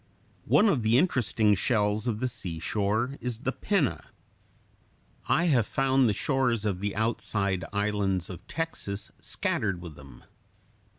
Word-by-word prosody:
One 215 - +5
of 150 - +2
the 110 +2 +3
interesting 120 - +2
shells 105 +1 +1
of 110 -2 -1
the 130 - +1
seashore 105 - -2
is 120 -2 -3
the 130 - -1
Pinna. 185 - 0 1.2
I 165 - +3
have 130 - +3
found 135 -2 +2
the - - +3
shores 120 -1 0
of 100 -4 -1
the 100 +1 -3
outside 100 -4 -1
islands 100 -3 0
of 90 +1 -10
Texas 105 -11 -4
scattered 100 -5 -1
with 85 -3 -9
them. 70 -4 -14
110 Hz, 135 wpm, -28 LUFS, 100-130 Hz, 1.2 s, One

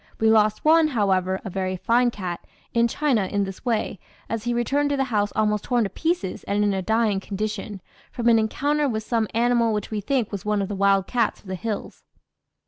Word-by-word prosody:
We 220 0 +4
lost 215 +1 +3
one, 320 0 +6
however, 190 -7 +1
a 195 - -5
very 185 0 -2
fine 240 +6 +2
cat, 185 -6 -5 0.3
in 235 -1 +3
China 240 -6 +1
in 200 +1 0
this 195 -1 -7
way, 225 -5 -1 0.3
as 225 0 -3
he 240 - 0
returned 280 +5 +1
to 285 - 0
the 270 - +2
house 205 -1 +1
almost 210 -1 +1
torn 245 -2 +2
to 200 - -3
pieces 325 - -2
and 205 +1 +1
in 205 -1 +2
a 190 - -1
dying 220 0 +1
condition, 205 0 -4 0.3
from 240 -1 -2
an 230 -1 +6
encounter 285 +6 0
with 220 -2 -2
some 225 -1 0
animal 235 -1 +2
which 210 0 -3
we 215 -1 -2
think 245 +1 -1
was 200 -3 -5
one 210 0 0
of 195 - -2
the 205 - -3
wild 195 -1 +3
cats 235 -3 0
of - - -28
the 190 - -5
hills. 205 +4 -5
215 Hz, 220 wpm, -24 LUFS, 200-240 Hz, 0.3 s, one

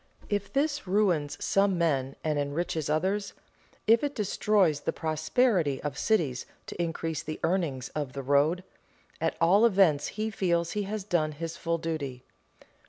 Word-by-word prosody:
If 205 -1 -1
this 285 -4 0
ruins 180 -7 +1
some 195 -2 +2
men 135 -6 0
and 150 -2 0
enriches 150 +1 -2
others, 190 +6 0 0.5
if 225 +3 +5
it 285 -1 -1
destroys 200 -6 +2
the - - -2
prosperity 155 - +1
of 145 -2 -3
cities 150 - 0 0.2
to - - -5
increase 165 -2 -2
the 155 - -6
earnings 155 -8 0
of 145 -4 -4
the 135 - -5
road, 145 +6 +2 0.6
at 165 - 0
all 185 +6 +5
events 190 -10 +4
he 220 +1 -1
feels 170 -4 0
he 210 -1 -2
has 215 -1 -3
done 165 -6 0
his 165 +2 -5
full 170 0 -1
duty. 145 -6 -4
165 Hz, 155 wpm, -28 LUFS, 150-200 Hz, 0.6 s, if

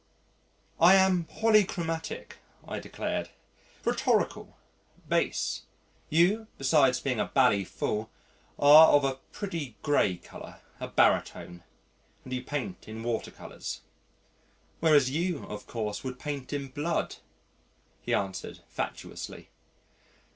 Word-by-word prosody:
"I 175 +3 +8
am 190 -3 +4
polychromatic," 180 -7 0 0.3
I - - -4
declaimed, - - -4 0.6
"rhetorical, - - 0 0.5
bass. - - 0 0.5
You 190 +8 +3
besides 135 -2 +3
being 130 -5 -1
a 105 - +2
bally 125 -7 +3
fool 105 +4 -3 0.5
are 150 +3 +9
of 145 -1 +5
a 135 -1 0
pretty 165 - -5
gray 105 - +2
colour, - - -12 0.2
a - - -4
baritone 85 0 +1 0.6
and 130 - -7
you 125 - -2
paint 125 -10 -5
in 110 +1 -7
water 115 -1 -2
colours." - - -8 1.0
"Whereas 145 -5 +4
you, 170 +1 -1
of 105 - -8
course, 105 -3 -4
would 130 -1 -5
paint 145 -3 -5
in 140 -2 -3
blood?" 150 +6 -2 0.8
he - - -4
answered 95 -1 -2
facetiously. - - -6
140 Hz, 110 wpm, -29 LUFS, 120-165 Hz, 1.0 s, are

